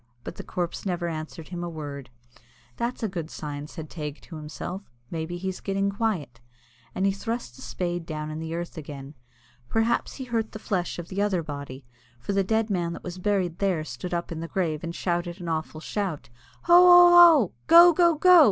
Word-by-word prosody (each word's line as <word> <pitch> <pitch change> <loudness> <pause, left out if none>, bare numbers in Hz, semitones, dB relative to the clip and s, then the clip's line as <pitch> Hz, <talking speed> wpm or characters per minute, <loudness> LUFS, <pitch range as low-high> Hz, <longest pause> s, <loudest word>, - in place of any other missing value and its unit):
But - - -8
the - - -6
corpse 175 -2 -4
never 175 -3 -2
answered 155 -1 -6
him 175 -1 -5
a 175 - -3
word. 145 -5 -7 0.7
"That's 235 0 -3
a - - +2
good 170 -5 -5
sign," 145 -2 -6
said 155 0 -8
Teig 150 -2 -6
to 170 - -11
himself. 155 +5 -6 0.3
"Maybe 165 +1 -4
he's 190 +1 -4
getting 195 0 -1
quiet," 190 - -2 0.6
and 190 - 0
he 195 - +3
thrust 200 - -5
the - - -14
spade 175 -1 -3
down 155 -1 -4
in 155 - -5
the 160 0 -4
earth 170 0 -5
again. 140 -1 -9 0.6
Perhaps 225 +1 0
he 265 - -6
hurt 230 -3 -2
the - - -5
flesh 185 -5 -2
of 175 -1 -7
the 195 +1 -2
other 195 -5 +1
body, 140 -3 -7 0.3
for 200 - -3
the 195 0 +2
dead 220 +2 0
man 170 -3 -1
that - - -9
was 180 0 -7
buried 185 -3 0
there 185 -6 +1
stood 130 +4 -7
up 170 0 -3
in 165 - -4
the 165 - -5
grave, 165 -4 -2
and 170 0 -5
shouted 175 0 -2
an 175 - -7
awful 160 -1 -3
shout. 180 - -4 0.3
"Hoo! 345 - +3
hoo!! 355 0 +9 0.3
hoo!!! 220 -10 0 0.2
Go! 340 +1 +9
go!! 340 0 +4
go!!! 360 +3 +7
175 Hz, 205 wpm, -26 LUFS, 155-200 Hz, 0.7 s, hoo